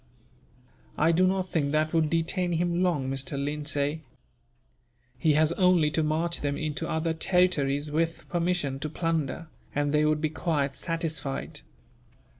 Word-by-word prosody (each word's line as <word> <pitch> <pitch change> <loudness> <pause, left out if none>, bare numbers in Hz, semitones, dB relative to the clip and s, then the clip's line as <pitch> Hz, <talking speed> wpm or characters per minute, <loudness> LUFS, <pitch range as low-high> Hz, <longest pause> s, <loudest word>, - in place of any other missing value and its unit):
"I 160 +2 +4
do 185 +3 +4
not 185 -1 0
think 145 -4 0
that 155 +1 +1
would 160 -2 +2
detain 170 +2 0
him 175 +1 0
long, 165 -8 +1
Mr. 135 +1 -3
Lindsay. 145 +1 -1 1.1
He 150 +5 +2
has 155 +1 +3
only 175 -4 +3
to 160 - +1
march 160 +2 -1
them 145 -1 -1
into 155 +2 -3
other 160 0 0
territories, 155 -5 +1
with 165 +2 -1
permission 170 -6 -1
to 155 +2 -3
plunder, 165 -1 -2 0.3
and 145 0 +1
they 150 0 +3
would 155 0 +2
be 155 0 -1
quite 145 -4 -1
satisfied. 160 -4 -3
155 Hz, 145 wpm, -27 LUFS, 145-170 Hz, 1.1 s, I